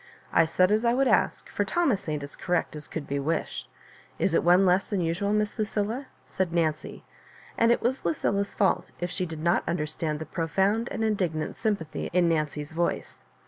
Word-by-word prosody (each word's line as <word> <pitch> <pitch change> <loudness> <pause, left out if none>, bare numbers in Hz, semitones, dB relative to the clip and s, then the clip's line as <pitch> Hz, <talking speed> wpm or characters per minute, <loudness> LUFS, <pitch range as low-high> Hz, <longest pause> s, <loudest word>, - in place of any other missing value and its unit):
I 165 - +5
said 185 +4 +3
as 215 +2 +2
I 235 0 +3
would 270 +1 +3
ask, - - +2
for - - -1
Thomas 265 - 0
ain't 150 -2 -2
as 140 - -9
correct 175 -3 -1
as 150 - -8
could 160 -3 -5
be 140 0 -2
wished. 155 +4 -2 0.5
Is - - +1
it - - +3
one 180 +3 +5
less 185 +1 +3
than 205 - -1
usual, 170 +5 0
Miss 210 +1 0
Lucilla 220 +5 -1
?" - - -34
said 185 -3 -2
Nancy; 160 -3 -1 0.5
and 230 0 +4
it 240 - +2
was 255 +3 0
Lucilla's 200 +4 0
fault 195 - +1
if 175 0 -3
she 185 -1 -2
did 160 -1 -7
not 170 +2 +3
understand 155 -2 -2
the 160 - -6
profound 195 +9 0
and 225 - -3
indignant. 180 -8 -1
ympathy 200 -8 -1
in 180 -1 +4
Nancy's 150 -2 -1
voice. 170 +2 -2
180 Hz, 195 wpm, -27 LUFS, 160-210 Hz, 0.5 s, I